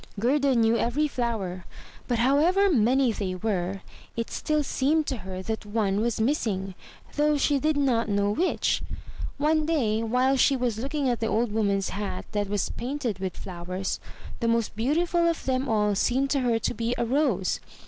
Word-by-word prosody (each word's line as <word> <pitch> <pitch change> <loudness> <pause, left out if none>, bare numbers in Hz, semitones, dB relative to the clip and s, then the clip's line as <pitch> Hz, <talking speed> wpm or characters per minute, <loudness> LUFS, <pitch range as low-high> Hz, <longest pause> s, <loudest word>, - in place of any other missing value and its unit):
Gerda 275 +4 +2
knew 225 0 +3
every 285 +6 +1
flower; 220 -9 -3 0.4
but 240 - 0
however 320 - +3
many 255 -1 +3
they 195 -4 -3
were, 190 -1 -2 0.4
it 230 - -3
still 305 -1 0
seemed 295 +3 +1
to 265 - -2
her 185 -2 -7
that 220 +2 -3
one 205 -1 0
was 235 -1 -1
missing, 215 -6 0 0.4
though 300 0 +3
she 285 0 +2
did 305 +2 +1
not 245 -6 +1
know 200 0 +1
which. 350 - +1 0.6
One 305 +2 +2
day, 230 -10 +1
while 250 +4 +2
she 275 +1 +4
was 245 -4 -1
looking 275 +2 -1
at 240 -2 0
the 225 - -1
old 225 0 0
Woman's 200 -3 0
hat 200 -1 -4
that 205 -2 -1
was 205 -1 -1
painted 245 -5 -3
with 190 -1 -4
flowers, 185 +1 -4 0.4
the 235 - 0
most 230 -2 0
beautiful 335 +9 +1
of 335 - -3
them 260 +1 0
all 210 -2 +2
seemed 260 +7 +1
to 280 - +2
her 240 -3 +2
to 225 - -2
be 230 +2 -2
a 235 - 0
rose. 240 - +1
235 Hz, 180 wpm, -26 LUFS, 205-275 Hz, 0.6 s, she